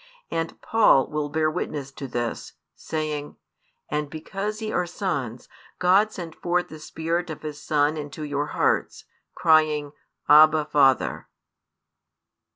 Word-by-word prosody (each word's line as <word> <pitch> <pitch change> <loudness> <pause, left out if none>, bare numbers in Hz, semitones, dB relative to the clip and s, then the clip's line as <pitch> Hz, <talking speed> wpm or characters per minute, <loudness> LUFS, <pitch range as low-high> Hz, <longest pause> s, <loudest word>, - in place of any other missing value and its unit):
And 165 0 -3
Paul 220 -12 +4
will 150 -1 -2
bear 155 +1 +1
witness 145 -4 -4
to 135 0 -7
this, 120 -1 -4 0.2
saying: 150 - -4 0.5
And 150 -1 -2
because 195 +7 -5
ye 215 -1 -4
are 180 -1 0
sons, 140 - -3 0.3
God 195 +4 +4
sent 170 -5 -7
forth 175 0 -1
the 155 - -10
Spirit 165 +3 -3
of 155 - -7
His 150 -1 -6
Son 150 +1 +1
into 150 +1 -6
your 145 0 -2
hearts, - - 0 0.3
crying, 155 -2 +3 0.4
Abba, 155 +1 +7
Father. 135 -3 +2
155 Hz, 130 wpm, -24 LUFS, 145-170 Hz, 0.5 s, Abba